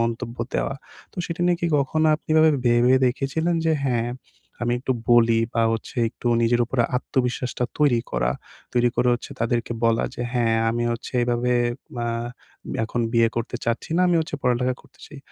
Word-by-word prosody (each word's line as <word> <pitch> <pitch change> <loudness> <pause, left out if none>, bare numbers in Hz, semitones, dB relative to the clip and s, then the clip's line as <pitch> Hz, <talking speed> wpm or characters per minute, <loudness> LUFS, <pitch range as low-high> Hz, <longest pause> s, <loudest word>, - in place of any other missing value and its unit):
মন্তব্য 115 +1 -2 0.2
দেওয়া। 135 - 0 0.4
তো - - -10
সেটা 170 0 -3
নিয়ে 175 -1 +2
কি 170 - +2 0.2
কখনো 155 +2 +1
আপনি 155 - -14
এভাবে 160 0 +6 0.2
ভেবে 120 +2 +4
দেখেছিলেন 140 +7 0
যে 160 - +3
হ্যাঁ, 120 -3 0 0.5
আমি 120 0 +1
একটু 130 - 0 0.2
বলি 115 -1 +5 0.2
বা 115 - +2
হচ্ছে 115 - -5
একটু 115 - -10 0.2
নিজের 120 +1 +2
উপরে 125 0 +1
আত্মবিশ্বাসটা 125 -1 -1
তৈরি 140 -6 +3
করা। - - +1 0.4
তৈরি 120 0 +3
করে 125 +1 +2
হচ্ছে 120 - -7
তাদেরকে 120 0 0
বলা 115 0 +3
যে 120 - -4
হ্যাঁ 115 -3 +2
আমি 120 +1 -1
হচ্ছে 115 - -7
এভাবে 120 +1 0 0.5
আ - - -1 0.8
এখন 120 +2 -3
বিয়ে 115 -1 +4
করতে 115 +1 -2
চাচ্ছি 115 +5 -2
না। - - +3
আমি 175 - +3
হচ্ছে 155 -2 -4
পড়ালেখা 125 0 +1
করতে - - -24
চাই। 150 - -12
120 Hz, 175 wpm, -23 LUFS, 115-135 Hz, 0.8 s, এভাবে